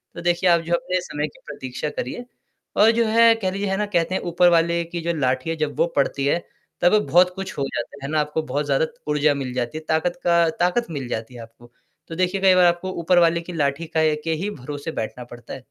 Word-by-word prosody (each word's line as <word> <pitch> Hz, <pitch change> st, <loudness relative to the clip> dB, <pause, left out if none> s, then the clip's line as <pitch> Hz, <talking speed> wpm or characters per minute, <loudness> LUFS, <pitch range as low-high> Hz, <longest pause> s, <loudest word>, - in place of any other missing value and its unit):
तो -, -, -6 dB
देखिए 175 Hz, +1 st, +2 dB
आप 170 Hz, -1 st, +4 dB
जो 170 Hz, +1 st, -3 dB
अपने 180 Hz, +1 st, -1 dB
समय 150 Hz, -3 st, -3 dB
की -, -, -17 dB
प्रतीक्षा 140 Hz, 0 st, -5 dB
करिए 145 Hz, -, -5 dB, 0.5 s
और 220 Hz, +2 st, +6 dB
जो 230 Hz, -, +3 dB
है 230 Hz, +1 st, +6 dB
कह 185 Hz, -2 st, 0 dB
लीजिए 200 Hz, +1 st, -3 dB
है 195 Hz, -, 0 dB
ना 210 Hz, -, 0 dB
कहते 170 Hz, +2 st, 0 dB
हैं -, -, -1 dB
ऊपर 175 Hz, +1 st, +5 dB
वाले 170 Hz, 0 st, +2 dB
की 170 Hz, -, -3 dB
जो -, -, +2 dB
लाठी 130 Hz, +3 st, 0 dB
है 165 Hz, -, -1 dB
जब 155 Hz, -2 st, -2 dB
वो 170 Hz, -, +4 dB
पड़ती 140 Hz, 0 st, 0 dB
है 155 Hz, +5 st, +2 dB, 0.4 s
तब 180 Hz, +5 st, +5 dB
बहुत 180 Hz, +3 st, +5 dB
कुछ 190 Hz, -1 st, -6 dB
हो 140 Hz, -, -1 dB
जाता, 135 Hz, +3 st, -6 dB
है 145 Hz, -, -4 dB
ना 155 Hz, -, +2 dB
आपको 150 Hz, +1 st, -1 dB
बहुत 145 Hz, +2 st, -2 dB
ज़्यादा 140 Hz, +2 st, +2 dB, 0.3 s
ऊर्जा 150 Hz, 0 st, +3 dB
मिल 135 Hz, -3 st, -4 dB
जाती 125 Hz, +4 st, -3 dB
है 155 Hz, -, -7 dB
ताकत 175 Hz, +3 st, 0 dB
का 170 Hz, -1 st, +4 dB
ताकत 180 Hz, +6 st, +1 dB
मिल 140 Hz, -5 st, -4 dB
जाती 115 Hz, +1 st, -5 dB
है 120 Hz, -, -8 dB
आपको। 115 Hz, +1 st, -15 dB, 0.4 s
तो 165 Hz, -, -7 dB
देखिए 185 Hz, +2 st, 0 dB
कई 190 Hz, -1 st, +6 dB
बार 180 Hz, -1 st, +5 dB
आपको 175 Hz, +2 st, +1 dB
ऊपर 175 Hz, +2 st, +4 dB
वाले 170 Hz, 0 st, +3 dB
की 175 Hz, +1 st, -9 dB
लाठी 145 Hz, 0 st, -1 dB
का 160 Hz, -1 st, 0 dB
ए 155 Hz, -1 st, +3 dB
के 165 Hz, -, -1 dB
ही 205 Hz, -, -1 dB
भरोसे 145 Hz, -1 st, -6 dB
बैठना 120 Hz, +3 st, -6 dB
पड़ता 120 Hz, 0 st, -11 dB
है। -, -, -7 dB
165 Hz, 250 wpm, -22 LUFS, 140-180 Hz, 0.5 s, और